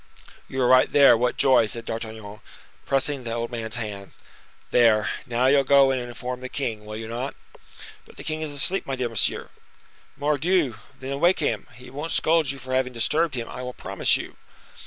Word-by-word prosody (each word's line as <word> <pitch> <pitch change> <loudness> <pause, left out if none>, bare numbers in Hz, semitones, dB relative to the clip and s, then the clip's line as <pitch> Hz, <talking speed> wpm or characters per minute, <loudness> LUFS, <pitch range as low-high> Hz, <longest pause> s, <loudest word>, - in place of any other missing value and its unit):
"You 130 - -5
are - - +3
right 130 0 +5
there, 140 -4 +7
what 120 +2 0
joy!" 130 -4 +4
said 115 +1 -3
D'Artagnan, 110 -2 -6 0.5
pressing 135 0 0
the 115 -1 -4
old 115 +1 -3
man's 115 -1 -4
hand. 105 -4 -6 0.6
"There, 110 -3 +4 0.2
now 120 +1 0
you'll 140 +1 +5
go 135 0 +5
and 130 -1 -1
inform 125 +1 -6
the 130 - -6
king, 115 -7 -4
will 105 - -6
you 110 0 -6
not?" 120 +4 -4 0.7
"But - - -18
the - - -8
king 155 0 -4
is 155 - -3
asleep, 150 +7 0
my 135 - -2
dear 125 -2 -2
monsieur." 115 -3 0 0.7
"Mordioux! 150 - +1 0.2
then 135 +1 -5
wake 175 +4 +4
him. 115 -9 -2
He 125 +2 -13
won't 150 +5 -4
scold 160 -3 +2
you 135 - -2
for 130 0 -7
having 130 -1 0
disturbed 150 +6 +1
him, 115 -2 -4
I - - -7
will 125 0 -6
promise - - 0
you." - - -9
125 Hz, 195 wpm, -24 LUFS, 115-140 Hz, 0.7 s, there